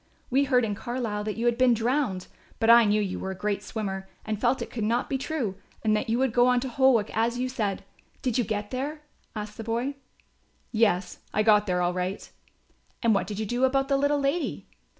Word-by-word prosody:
We 275 +3 +3
heard 250 -3 +3
in 210 - -2
Carlisle 220 -1 -3
that 215 0 -3
you 230 - -1
had 240 0 +2
been 255 -2 +5
drowned, 230 -5 0 0.3
but 225 0 +5
I 235 -1 +8
knew 210 +1 +3
you 195 -3 -2
were 190 - -4
a 190 - -5
great 205 0 -1
swimmer 195 -3 -5 0.2
and 215 -1 -3
felt 250 +1 +2
it - - -10
could 225 - -3
not 235 +6 0
be 270 - 0
true 255 -10 -3 0.3
and 215 -1 +3
that 220 +3 -2
you 230 - +2
would 260 -2 +1
go 245 0 +5
on 250 0 +4
to 265 - -3
Holwick 245 -4 +3
as 230 +2 +1
you 255 +1 -1
said. 215 -6 -2 0.4
Did 250 -4 0
you 245 - +3
get 210 -1 -3
there?" 290 +4 -4 0.3
asked 210 0 -6
the 225 - -5
boy. 235 +5 -1 0.8
"Yes, 205 -5 +1 0.2
I 215 - +3
got 210 -1 +4
there 180 -1 +1
all 175 0 +1
right." 185 +2 -4 0.7
"And 230 -1 +4
what 200 - 0
did 205 - -5
you 215 - -2
do 240 +5 -1
about 270 +1 +2
the 275 - +3
little 285 +1 +2
lady?" 280 +4 -1
230 Hz, 230 wpm, -27 LUFS, 210-255 Hz, 0.8 s, I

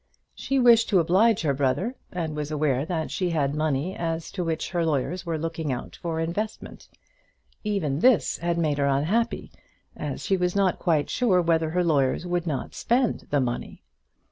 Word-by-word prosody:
She 275 - -2
wished 235 -3 +5
to 195 - +4
oblige 190 +5 +3
her 145 -3 +2
brother, 140 - 0 0.2
and 165 -4 -3
was 150 -1 -3
aware 150 -2 0
that 165 -3 -2
she 180 -2 -1
had 145 -4 0
money 155 +3 -1
as 165 -1 -3
to 185 -3 -3
which 165 -1 -2
her 175 -2 0
lawyers 165 +4 -1
were 165 -1 -1
looking 160 -2 -3
out 125 - -5
for 165 -2 -3
an 165 - 0
investment. 210 +6 -5 0.8
Even 180 -10 -1
this 220 - +3
had 170 0 -1
made 150 -4 0
her 140 - +2
unhappy, 170 - 0 0.4
as - - -5
she 195 - +2
was 180 0 0
not 195 -2 +2
quite 160 -5 +1
sure 225 -8 +3
whether 165 -2 +2
her 180 +2 +1
lawyers 145 -1 +1
would 175 -1 -1
not 140 -5 -3
spend 245 0 0
the 145 - +2
money. 120 -2 -4
165 Hz, 185 wpm, -25 LUFS, 150-185 Hz, 0.8 s, wished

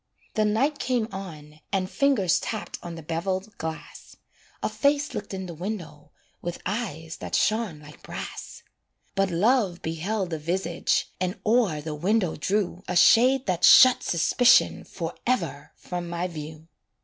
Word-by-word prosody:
The 215 -1 +2
night 270 +8 +1
came 245 -4 0
on, 155 -6 -9
and 190 -2 0
fingers 195 - +2
Tapped 220 -2 -5
on 170 -1 -7
the 165 - -9
beveled 185 +6 -3
glass, 160 0 -7 0.5
A - - +2
face 285 +1 +1
looked 205 - -5
in 190 -1 -4
the 175 - -7
window 165 -5 -6 0.3
With 175 0 -5
eyes 180 -6 -4
that - - -4
shone 215 -8 0
like 150 0 -14
brass; - - -8 0.5
But 195 0 +1
Love 195 0 +1
beheld 180 +4 -2
the 160 - -3
visage, 175 +5 0
And 185 +3 -2
o'er 215 -9 +2
the 155 +1 -5
window 185 +3 0
drew 190 +1 -1
A 180 - -2
shade 255 +8 +5
that 180 -3 -1
shut 255 -1 +8
Suspicion 235 +9 +3
Forever 165 - -3
from 175 -1 -6
my 170 +1 -2
view. 155 -1 -9
185 Hz, 150 wpm, -26 LUFS, 165-220 Hz, 0.5 s, shut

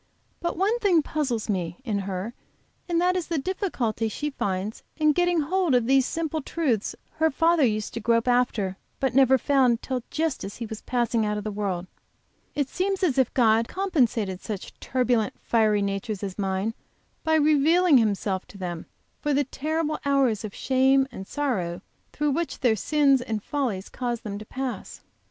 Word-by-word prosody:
But 340 - -2
one 415 +6 +2
thing 360 -8 +3
puzzles 265 -9 -2
me, 175 -5 -2
in 210 -4 0
her, 195 +3 -4 0.6
and 340 -1 +2
that 360 +1 +2
is 360 -3 -2
the 335 - -1
difficulty 270 - -1
she 295 +7 -3
finds 200 -3 -3 0.2
in 305 -1 +4
getting 350 +1 +2
hold 345 -1 +1
of 245 -2 +3
these 265 +1 +4
simple 320 -1 -2
truths 265 -9 -1 0.2
her 320 +1 +3
father 330 +2 +3
used 215 -4 0
to 230 - -3
grope 230 +2 +2
after 235 -6 +1 0.2
but 265 -2 0
never 265 0 +5
found 255 -3 +2
till 255 -2 -2
just 315 -3 -1
as 200 - -6
he 235 - -4
was 220 -1 -7
passing 235 -2 0
out 210 0 -1
of 210 - -4
the 215 - -3
world. 195 -4 -2 0.7
It 285 -2 0
seems 385 +5 -1
as 280 -7 +2
if 260 - +3
God 225 -3 +5
had 230 0 -1
compensated 240 - 0
such 205 -4 -6
turbulent, 245 -4 0
fiery 215 -3 +2
natures 200 +1 -3
as 195 -2 -4
mine, 195 +3 -1 0.5
by 320 -1 +2
revealing 310 +1 +5
Himself 200 -3 0
to 200 - -13
them, 175 -3 -5 0.3
for 295 -2 0
the 285 - +3
terrible 305 +3 -2
hours 270 -7 +2
of 210 -2 -6
shame 265 +1 +3
and 190 - -8
sorrow 190 -12 -2 0.3
through 295 -1 0
which 330 +4 -2
their 240 -4 +4
sins 275 +2 +3
and 220 -4 -3
follies 240 -10 -2
cause 240 -2 -3
them 205 -1 -5
to 215 - -9
pass. 260 +1 -5
250 Hz, 180 wpm, -25 LUFS, 215-300 Hz, 0.7 s, never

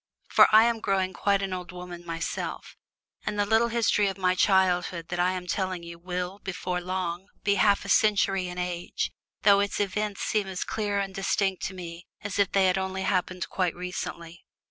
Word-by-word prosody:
For - - +7
I 215 +1 +8
am 235 -1 +1
growing 190 -3 0
quite 200 +1 +1
an 190 -1 -2
old 180 0 -5
woman 180 -1 -8
myself, 165 -1 -4 0.5
and 210 0 -3
the 205 - +2
little 225 +3 +3
history 225 -3 +2
of 195 - -3
my 185 -1 +2
childhood 180 -3 +2
that 175 - -3
I 180 +1 +3
am 180 -1 -4
telling 185 -1 -2
you 170 0 -9
will, 180 +2 -4
before 180 -2 -3
long, 180 0 -3 0.2
be 200 - +3
half 200 -1 +3
a - - -6
century 195 -3 +3
in 180 0 -7
age, 180 -1 -3 0.3
though 200 -1 +6
its 200 0 -1
events 205 0 -1
seem 210 -2 0
as 190 -1 -3
clear 205 -2 -2
and 195 -1 -3
distinct 195 0 0
to 190 - -8
me 170 -1 -8 0.2
as 205 0 -3
if 200 -1 +3
they 195 -1 +4
had 185 0 +3
only 190 0 -3
happened 185 -2 -1
quite 180 -3 0
recently! 170 -2 -6
190 Hz, 195 wpm, -27 LUFS, 180-200 Hz, 0.5 s, I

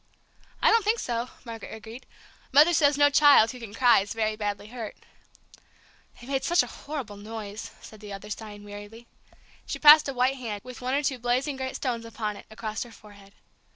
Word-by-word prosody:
"I - - +6
don't 455 -1 +4
think 430 +3 +2
so," 240 - -3 0.2
Margaret 230 -2 -8
agreed. 225 +3 -11 0.4
"Mother 300 +6 +6
says 290 -3 +3
no 290 0 +5
child 285 -6 +6
who 250 - -10
can 230 -4 -9
cry 245 -2 +5
is 200 +1 -4
very 215 -1 0
badly 205 -1 -4
hurt." 230 -3 -7 1.2
"They 240 - -12
made 270 0 -2
such 345 +1 +3
a - - -9
horrible 270 -9 -7
noise," 210 0 -7
said 215 - -13
the 210 -1 -10
other, 200 +2 -8
sighing 210 -1 -8
wearily. 205 +3 -10 0.6
She - - -3
passed 300 -1 +8
a - - -3
white 255 +2 +1
hand, 220 -5 -5
with 250 0 -10
one 255 +2 -1
or 290 - 0
two 265 -2 -1
blazing 250 +4 0
great 260 0 -5
stones 240 -4 -3
upon 220 -2 -4
it, - - -13
across 220 0 -5
her 240 - -5
forehead. 200 -2 -16
235 Hz, 195 wpm, -26 LUFS, 210-270 Hz, 1.2 s, passed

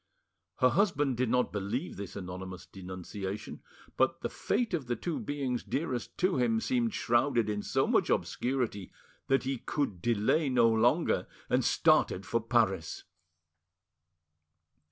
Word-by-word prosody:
Her 130 - +4
husband 145 - +2
did 125 -1 +1
not 125 +1 +2
believe 105 - -3
this 100 -1 -7
anonymous 95 -1 -7
denunciation, 95 +2 -7 0.4
but - - +2
the - - -3
fate 230 -1 -1
of 150 -7 -1
the 120 - 0
two 165 +7 -3
beings 135 -4 -2
dearest 130 -2 -3
to 185 -4 +2
him 115 -3 +2
seemed 235 - 0
shrouded 120 -1 +2
in 105 -1 -1
so - - +1
much - - +2
obscurity 120 -7 -1 0.4
that 135 0 +3
he 135 -1 -2
could 110 - -2
delay 120 - +2
no 120 -3 +4
longer, 120 +9 +2 0.2
and - - +3
started 95 - +3
for 115 - 0
Paris. 110 -8 0
120 Hz, 135 wpm, -30 LUFS, 100-135 Hz, 0.4 s, Her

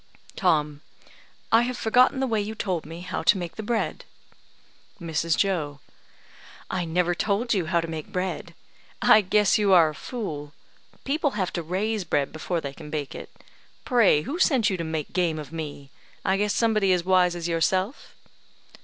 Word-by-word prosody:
Tom: 150 -6 +1 0.7
"I 225 - +6
have 245 +1 -2
forgotten 250 +4 +3
the - - +2
way 225 -4 0
you 215 +2 -5
told 180 -7 -3
me 165 +2 -8
how 180 - -4
to 205 - +4
make 175 -2 -5
the - - -5
bread." 225 +1 -2 1.0
Mrs. 165 -1 -1
Joe: 155 -8 0 0.9
"I 180 -2 -1
never 175 +1 +1
told 215 +6 0
you 185 -6 0
how 170 +1 +2
to 165 - -5
make 160 -2 -6
bread. 185 0 -4 0.4
I 215 - +6
guess 210 +2 +3
you 200 -2 +3
are 165 -3 +6
a - - -7
fool. 150 - -6 0.5
People 285 -3 -1
have 185 -3 -1
to 175 - -2
raise 195 +5 -2
bread 145 -5 0
before 170 +2 -2
they 140 -2 -5
can 150 0 -11
bake 150 -2 -4
it. - - -8 0.6
Pray 220 -12 +4
who 320 - -4
sent 250 - +3
you 190 - -1
to 170 - -3
make 160 -2 -4
game 175 -3 +1
of 150 -1 -8
me? 145 -3 -7 0.3
I 190 -1 +3
guess 205 +1 0
somebody 215 -4 +2
as 180 -1 0
wise 180 -1 +3
as 170 -1 -4
yourself." 185 - -1
180 Hz, 180 wpm, -25 LUFS, 160-210 Hz, 1.0 s, I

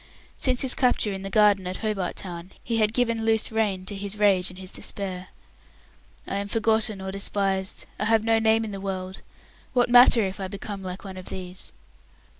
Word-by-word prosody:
Since 255 -2 +2
his 265 -2 +5
capture 245 -5 +1
in 190 - -5
the 195 - -5
garden 200 -2 +4
of 185 - -4
Hobart 210 -5 -2
Town, 175 0 -8
he 230 -1 -1
had 215 -1 +2
given 230 -1 0
loose 220 0 +2
rein 205 -4 -1
to 205 - -5
his 200 +1 -4
rage 195 -3 +3
and 185 - -12
his 185 -1 -7
despair. 185 -2 -4 1.0
"I 195 - -2
am 200 0 -3
forgotten 220 -1 +1
or 190 0 -5
despised; 195 -1 -1
I 210 - 0
have 225 0 +3
no 225 0 +3
name 225 0 +3
in 215 - -6
the 195 -1 -6
world; 190 -1 -5 0.5
what 245 -1 +2
matter 245 -1 +7
if 190 0 -4
I 190 - -3
become 200 +1 -7
like 185 0 -7
one 190 -2 -8
of 185 - -8
these?" 185 0 -7
200 Hz, 200 wpm, -25 LUFS, 190-220 Hz, 1.0 s, matter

